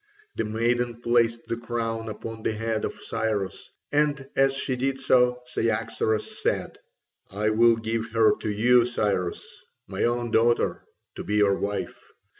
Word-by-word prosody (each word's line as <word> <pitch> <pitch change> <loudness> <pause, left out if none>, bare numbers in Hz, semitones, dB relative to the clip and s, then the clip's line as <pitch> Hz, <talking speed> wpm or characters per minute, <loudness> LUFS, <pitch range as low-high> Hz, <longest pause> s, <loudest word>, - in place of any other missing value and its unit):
The - - -1
maiden 120 +2 0
placed 115 -1 +1
the 115 - -3
crown 115 -1 -3
upon 110 +1 -7
the 110 - -1
head 110 0 -2
of - - -3
Cyrus, 105 -4 -3 0.2
and 145 -2 +1
as 135 0 +3
she 135 -1 -1
did 135 +1 -1
so 125 -1 +3
Cyaxares 115 -2 -1
said: - - -1 0.5
"I 105 +2 0
will 115 +1 +5
give 115 0 -3
her 115 -1 +4
to 110 - -4
you, 120 +3 +4
Cyrus, 100 -7 -1 0.4
my - - -3
own 120 0 -1
daughter, 115 +1 +2 0.3
to - - -5
be 105 - -2
your 105 -1 +4
wife. 100 -1 -3
115 Hz, 150 wpm, -26 LUFS, 110-120 Hz, 0.5 s, will